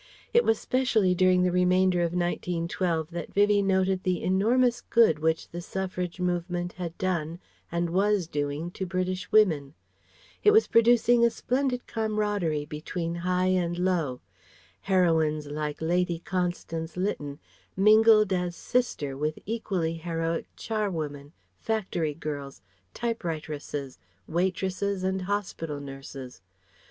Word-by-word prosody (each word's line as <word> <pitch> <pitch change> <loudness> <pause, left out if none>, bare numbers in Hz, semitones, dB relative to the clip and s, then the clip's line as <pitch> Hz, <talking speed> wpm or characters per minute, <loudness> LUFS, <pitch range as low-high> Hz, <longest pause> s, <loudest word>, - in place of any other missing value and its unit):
It 475 - +5
was 225 - +3
specially 225 -8 +2
during 185 0 +4
the 180 - +2
remainder 180 0 +3
of 170 -1 +1
1912 175 -1 -1
that 170 -1 -5
Vivie 205 0 +4
noted 190 -1 +1
the 185 -2 -1
enormous 240 +6 +2
good 220 -10 +4
which 160 +1 0
the 175 - -6
Suffrage 180 -1 -4
movement 175 0 -2
had 175 -2 -6
done 170 -3 -1 0.3
and 170 0 -1
was 200 0 +2
doing 145 +2 -3
to 190 +1 -5
British 185 0 -2
women. 160 -10 +3 0.7
It - - +7
was 435 +2 +6
producing 235 +1 +4
a 235 - +6
splendid 250 +1 -1
camaraderie 210 -8 -1
between 165 +3 -4
high 180 +2 0
and 175 -2 0
low. 170 -8 0 0.6
Heroines 160 -5 +2
like 150 0 -4
Lady 175 +1 +1
Constance 175 -2 -3
Lytton 145 -7 -2 0.4
mingled 215 0 +6
as 180 -1 -1
sister 170 - -1
with 150 +2 -2
equally 185 -7 -2
heroic 165 0 -2
charwomen, 160 -10 -3 0.3
factory 180 -9 -1
girls, 145 -7 -6 0.3
typewriteresses, 155 - -4 0.3
waitresses 190 +2 -1
and 190 0 0
hospital 180 -6 -3
nurses. 135 -4 -9
180 Hz, 125 wpm, -27 LUFS, 160-195 Hz, 0.7 s, It